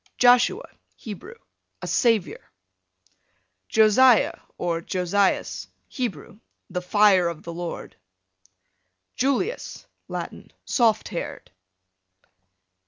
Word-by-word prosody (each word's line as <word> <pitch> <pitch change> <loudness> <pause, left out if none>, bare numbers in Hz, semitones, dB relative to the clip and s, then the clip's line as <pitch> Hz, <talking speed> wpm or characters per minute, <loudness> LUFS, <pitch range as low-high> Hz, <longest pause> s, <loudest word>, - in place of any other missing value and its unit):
Joshua, 250 - +4 0.3
Hebrew, 220 - -9 0.5
a - - -2
savior. 220 - 0 1.2
Josiah, 220 +2 +5 0.2
or 170 -1 -2
Josias, 185 +3 0 0.2
Hebrew, 225 -4 -5 0.3
the 180 0 -2
fire 190 -1 +4
of 170 -2 -5
the 170 - -7
Lord. 175 0 -6 1.2
Julius, 280 - -2 0.2
Latin, - - -7
soft 230 -4 +2
haired. - - -6
210 Hz, 80 wpm, -24 LUFS, 180-245 Hz, 1.2 s, Josiah